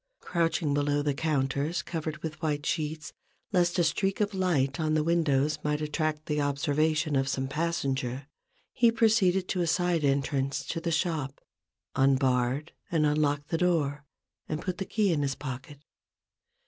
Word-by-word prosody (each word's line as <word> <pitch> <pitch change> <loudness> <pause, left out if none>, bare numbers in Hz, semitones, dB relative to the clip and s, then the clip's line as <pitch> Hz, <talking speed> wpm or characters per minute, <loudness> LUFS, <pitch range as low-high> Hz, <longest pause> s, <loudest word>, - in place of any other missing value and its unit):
Crouching 165 -3 0
below 145 0 +1
the 145 -1 +1
counters 145 +2 0
covered 155 -2 -5
with 160 -1 -5
white 150 -2 -1
sheets, 155 -1 -2 0.4
lest 175 -2 +2
a 175 - +4
streak 195 +4 0
of 210 -1 0
light 160 -8 +1
on 155 -1 +1
the 155 - +2
windows 155 -3 +2
might 150 0 0
attract 155 0 -2
the 150 -1 0
observation 150 +2 +1
of 135 0 +1
some 135 0 -1
passenger, 135 -4 -2 0.5
he 235 -2 +4
proceeded 210 -5 +3
to 180 - -1
a 170 - 0
side 175 -1 +1
entrance 140 0 0
to 165 - -3
the 170 - -1
shop, 160 -5 -1 0.6
unbarred 130 +1 +2 0.2
and 160 -3 +2
unlocked 150 -1 +1
the 165 - 0
door, 150 -5 +1 0.5
and 155 - -2
put 185 -2 -3
the 195 - -2
key 205 -4 +1
in 150 - 0
his 135 -1 -1
pocket. 135 +1 -7
155 Hz, 160 wpm, -28 LUFS, 140-170 Hz, 0.6 s, a